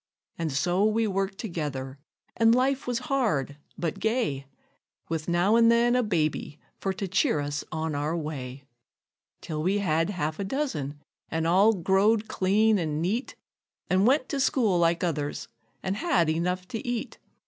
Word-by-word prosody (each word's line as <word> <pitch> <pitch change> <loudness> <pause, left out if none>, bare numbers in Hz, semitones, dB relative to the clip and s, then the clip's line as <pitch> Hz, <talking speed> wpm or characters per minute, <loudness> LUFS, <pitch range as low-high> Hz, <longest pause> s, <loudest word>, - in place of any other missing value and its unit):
And 165 -2 -2
so 175 +8 +1
we 220 +1 +2
worked 195 -1 -1
together: 145 - -4 0.4
and 230 0 +5
life 265 +1 +1
was 245 -1 0
hard, 160 - 0 0.2
but 165 -3 -3
gay, 220 - -1 0.6
With 160 0 -3
now 175 +5 +3
and 230 0 +6
then 240 +1 +3
a 250 - +4
baby 155 -7 -1 0.2
for 195 - -1
to 195 +1 -4
cheer 180 -4 +2
us 145 0 -3
on 160 0 -2
our 150 +4 -1
way; 140 -4 -6 0.8
Till 155 -2 -4
we 190 +5 +1
had 165 -3 +1
half 160 -4 -3
a - - -1
dozen, 190 - -3 0.3
an' 160 0 -1
all 195 +6 +5
growed 200 +4 +2
clean 210 +3 +2
an' 155 -3 -2
neat, 205 - -2 0.6
An' 185 +2 +4
went 260 +2 +3
to 280 - -2
school 225 -9 +2
like 170 0 +2
others, 150 -4 -2 0.4
an' 190 - -1
had 245 - +1
enough 180 +3 -1
to 225 -3 -4
eat. 245 -2 -4
185 Hz, 160 wpm, -27 LUFS, 155-220 Hz, 0.8 s, and